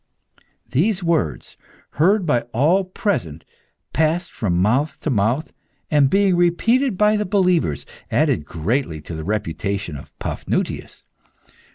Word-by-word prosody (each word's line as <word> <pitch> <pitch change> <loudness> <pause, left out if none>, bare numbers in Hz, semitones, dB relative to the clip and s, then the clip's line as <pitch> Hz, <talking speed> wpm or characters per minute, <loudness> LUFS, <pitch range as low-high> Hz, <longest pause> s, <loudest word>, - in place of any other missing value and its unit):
These 185 - +1
words, 170 -2 -1 0.3
heard 190 +5 +3
by 125 -7 +2
all 165 +11 +3
present, 90 - -2 0.5
passed 160 +3 +1
from 90 -6 -1
mouth 125 +11 +1
to 155 - -1
mouth, 120 +7 0 0.4
and 145 -3 +4
being 195 +2 +3
repeated 210 +7 +2
by 210 +1 +4
the 210 - 0
believers, 180 - +1 0.2
added - - +2
greatly 85 - -2
to 80 - -8
the 80 0 -5
reputation 100 -2 -3
of 70 - -12
Paphnutius. - - -3
150 Hz, 125 wpm, -21 LUFS, -, 0.5 s, and